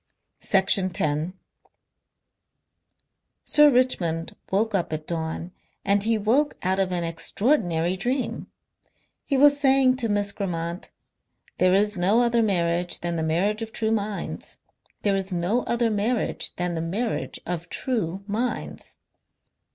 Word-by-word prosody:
Section 190 -1 +3
10 155 +1 -1 2.1
Sir 300 0 +6
Richmond 185 - 0 0.2
woke 215 +3 +1
up 185 -5 0
at 155 0 -4
dawn 165 +1 -4 0.3
and 200 0 +3
he 225 +1 +2
woke 245 +8 +1
out 190 +1 +1
of 190 -1 +1
an 175 -1 0
extraordinary 175 - 0
dream. 250 +7 -2 0.8
He 275 - 0
was 285 +1 +6
saying 265 -2 +4
to 235 -3 -1
Miss 205 -1 +1
Grammont: 170 -3 -4 0.7
"There 185 0 +4
is 205 0 +2
no 195 +7 +3
other 235 -1 +2
marriage 175 -4 +1
than 170 0 -2
the 165 - -1
marriage 185 +8 0
of 225 0 -5
true 220 0 -1
minds. 210 -2 -3 0.5
There 200 -1 +2
is 195 0 -3
no 180 +7 0
other 235 -1 +1
marriage 215 +3 -1
than 180 0 -1
the 165 - -2
marriage 205 +8 -3
of 170 -1 -4
true 200 -7 -2
minds." 225 +4 -4
200 Hz, 135 wpm, -25 LUFS, 175-230 Hz, 2.1 s, Sir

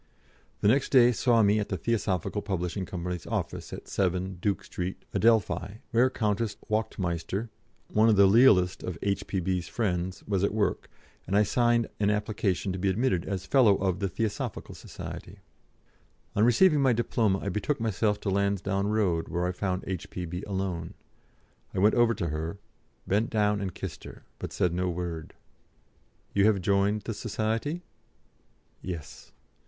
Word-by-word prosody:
The - - +3
next 130 +6 +3
day 125 -2 +6
saw 115 -1 +3
me 105 +1 +4
at 105 - -3
the 95 - -1
Theosophical 105 -3 -1
Publishing 95 -1 -3
Company's 90 -1 -5
office - - -3
at - - -8
7, 95 -1 -1
Duke 100 +1 0
Street, 90 +1 -5
Adelphi, 110 -2 +1
where 120 +2 +4
Countess 110 -3 -1
Wachtmeister 95 0 -2 0.4
one 110 +2 +5
of 110 - +5
the 100 0 +7
lealest 95 -4 +5
of 90 -4 -5
H.P.B.'s 95 -3 -1
friends 90 -5 -2
was 100 -2 0
at 100 - +1
work, 105 -2 0 0.4
and 100 +3 +2
I 105 - +6
signed 120 +1 +2
an 105 -1 +2
application 105 -3 -1
to 95 - -4
be 95 +1 +1
admitted 95 -3 +1
as 95 -1 -3
fellow 120 -6 +5
of 95 -2 -1
the 100 -2 -1
Theosophical 110 +3 -3
Society. - - -9 1.0
On 105 - +3
receiving 145 +7 +5
my 130 -2 +4
diploma 115 -3 +1
I 100 - -4
betook 105 +9 -1
myself 105 -1 0
to 100 - -1
Lansdowne 100 0 0
Road, 100 -6 +1
where 90 0 -1
I 90 - 0
found 90 0 -2
H.P.B. 90 -1 -5
alone. 95 -4 -3 0.8
I - - -3
went 105 +3 +4
over 120 -1 +3
to 85 - -2
her, 80 +5 -4 0.5
bent 105 +4 +1
down 105 -2 +1
and 95 -3 -4
kissed - - -7
her, - - -11 0.2
but - - -5
said 90 -2 0
no 90 +1 0
word. 85 -2 -5 1.0
"You 100 0 +4
have 105 -3 +3
joined 100 +2 +1
the 115 - -3
Society?" 115 - -2 1.0
"Yes." 85 -5 -7
100 Hz, 160 wpm, -28 LUFS, 90-110 Hz, 1.0 s, the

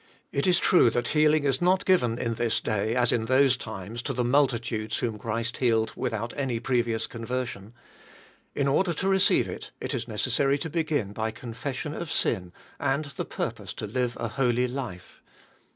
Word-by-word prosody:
It 140 +6 0
is 180 -1 +5
true 175 -10 +5
that 120 0 -1
heal 150 0 +4
ing 155 - +1
is 135 -2 +1
not 185 +2 +3
given 125 -12 +3
in 115 -1 -1
this 115 0 0
day 110 +1 -1
as 125 -1 +3
in 110 -1 +1
those 130 +1 +4
times, 110 -1 -6
to 135 - -3
the 125 0 0
multi 130 0 +3
tudes 110 -1 -3
whom 115 -3 -2
Christ 115 +2 -3
healed 110 -3 +2
without 115 +1 -3
any 130 -5 -1
previous 120 -2 0
conversion. 115 -2 -5 0.8
In 140 - +1
order 175 +6 +2
to 190 +5 -2
receive 190 -1 +4
it - - -7
it - - -4
is - - -3
necessary 130 +5 +1
to 160 +2 -5
begin 155 - -1
by 110 +1 -1
confession 125 +6 -5
of 160 0 -5
sira. 90 -6 0 0.3
and 140 +3 0
the 140 - -5
purpose - - -4
to 105 - -5
five 120 +2 -1
a 115 - -2
holy 125 0 +1
life. 120 -9 -7
125 Hz, 185 wpm, -27 LUFS, 115-140 Hz, 0.8 s, is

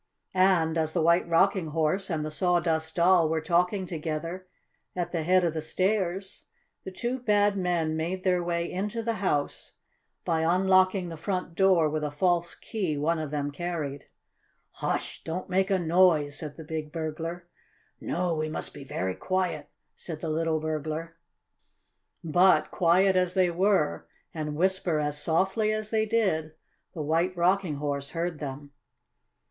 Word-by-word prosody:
And 180 -4 +3
as 160 0 0
the 175 - +1
White 170 +1 +3
Rocking 185 +1 +3
Horse 160 +5 0
and 155 -3 -1
the 155 - -4
Sawdust 165 -2 0
Doll 170 -2 +4
were 160 0 +1
talking 180 +4 +1
together 165 +2 -4 0.5
at 175 -1 -2
the 170 - -1
head 180 +3 +3
of 170 -2 +1
the 160 - -3
stairs 190 +3 -2 0.4
the - - -6
two 240 +7 -3
bad 205 -3 +2
men 175 -4 0
made 175 +4 -3
their 180 -2 +2
way 170 0 -2
into 210 +5 -3
the 230 -1 -1
house 145 -7 -1 0.5
by 165 -1 +1
unlocking 185 +2 +3
the 165 - -7
front 180 0 -3
door 185 -3 +4
with 155 0 -2
a 150 - -1
false 170 +3 0
key 185 -10 -3
one 160 +3 0
of 155 -2 -4
them 145 -1 -2
carried. 145 -3 -4 0.7
"Hush! - - -3
Don't 180 +3 -5
make 190 +2 +2
a 195 - +3
noise!" 165 -4 +3
said 150 -1 -7
the 160 - -8
big 155 -1 -5
burglar. 165 +2 -5 0.5
"No, 175 -1 -1
we 155 0 -2
must 155 - -4
be 145 - -9
very 95 -8 -3
quiet," 185 - -2 0.3
said 160 -3 -7
the 165 - -3
little 160 0 0
burglar. 155 +1 -4 1.1
But, 175 +4 +4
quiet 185 +3 +3
as 180 -1 +1
they 185 -2 +3
were, 185 -3 +1 0.3
and 150 -2 -4
whisper 180 -1 +1
as 150 0 -2
softly 190 +7 +1
as 215 0 -3
they 220 -1 +1
did, 190 -9 0 0.4
the 155 - -3
White 165 +4 0
Rocking 180 -2 +2
Horse 140 -1 -3
heard 170 -2 -3
them. 145 0 -7
170 Hz, 160 wpm, -27 LUFS, 155-185 Hz, 1.1 s, Doll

